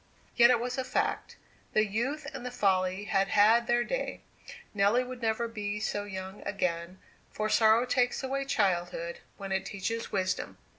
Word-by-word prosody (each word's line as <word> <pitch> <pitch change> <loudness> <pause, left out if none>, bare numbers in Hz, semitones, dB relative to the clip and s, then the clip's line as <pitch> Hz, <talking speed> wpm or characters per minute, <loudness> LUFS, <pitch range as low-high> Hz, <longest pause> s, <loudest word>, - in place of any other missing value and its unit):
Yet 235 0 +7
it 245 -2 +4
was 250 +2 -3
a - - 0
fact; 255 - -2 0.4
the 215 - +4
youth 255 +9 -2
and - - -7
the 250 - -3
folly 190 -4 +1
had 195 -1 +1
had 225 +4 +4
their 240 0 +3
day. - - -3 0.5
Nelly 205 +5 +3
would 250 0 -8
never 225 +1 0
be 210 -2 -4
so 205 -1 -2
young 190 0 -7
again, 180 -2 -2 0.3
for 215 0 -2
sorrow 220 +2 +5
takes 250 +1 +1
away 275 +1 -2
girlhood 175 -7 0 0.2
when 195 -1 -6
it 190 0 0
teaches 225 +3 -4
wisdom. 185 -2 -2
215 Hz, 165 wpm, -29 LUFS, 195-240 Hz, 0.5 s, Yet